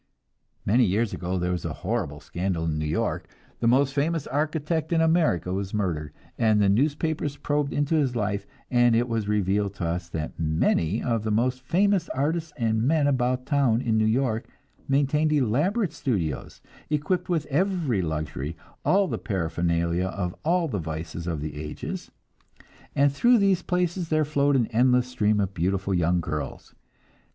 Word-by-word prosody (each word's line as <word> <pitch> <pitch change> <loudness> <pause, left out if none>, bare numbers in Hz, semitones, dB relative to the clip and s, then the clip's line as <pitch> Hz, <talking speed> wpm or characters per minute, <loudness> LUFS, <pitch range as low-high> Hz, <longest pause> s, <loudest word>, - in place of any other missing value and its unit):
Many 120 +6 +4
years 105 +3 0
ago 90 +1 -2
there 90 0 -1
was 90 -2 -2
a - - -3
horrible 75 +1 -2
scandal 85 0 -2
in 75 -2 -1
New 75 - -2
York. 75 - -1 0.3
The 115 - +1
most 135 +3 +3
famous 150 +2 0
architect 155 +2 -1
in 165 - +3
America 160 - +2
was 100 +1 -3
murdered, 80 -8 -2 0.3
and 110 -2 +4
the 100 -1 +4
newspapers 145 +5 0
probed 145 0 -1
into 145 +2 0
his 140 -6 +2
life, 105 -2 -1 0.2
and 120 -2 +4
it 120 +2 +2
was 115 -3 -2
revealed 100 -1 0
to 95 - -3
us 85 +1 -3
that 80 -1 -5
many 80 +4 +1
of 115 -3 0
the 110 - -3
most 125 +4 +1
famous 185 +5 +2
artists 155 +4 -1
and 110 -3 +1
men 150 +4 +2
about 125 -2 +1
town 135 -6 +2
in 115 -3 +1
New 110 - +3
York 115 -1 0 0.4
maintained 145 +3 +2
elaborate 155 - +1
studios, 85 - -3 0.3
equipped 175 +5 -1
with 165 -4 0
every 160 - +1
luxury, 80 -2 -3 0.3
all 195 +1 +3
the - - -3
paraphernalia 85 -1 0
of 90 -2 -3
all 170 +1 +2
the 105 -9 -2
vices 80 +1 -5
of 80 -4 -2
the 75 -1 -5
ages; 75 -1 -6 0.9
and 140 0 +3
through 240 +12 +5
these 195 -4 +3
places 180 -1 -1
there 155 -1 +2
flowed 145 -1 +2
an 125 -3 +3
endless 125 +2 +4
stream 110 -4 +1
of 100 -1 -1
beautiful 95 +3 -1
young 90 0 +2
girls. 75 -4 -5
115 Hz, 165 wpm, -26 LUFS, 90-150 Hz, 0.9 s, through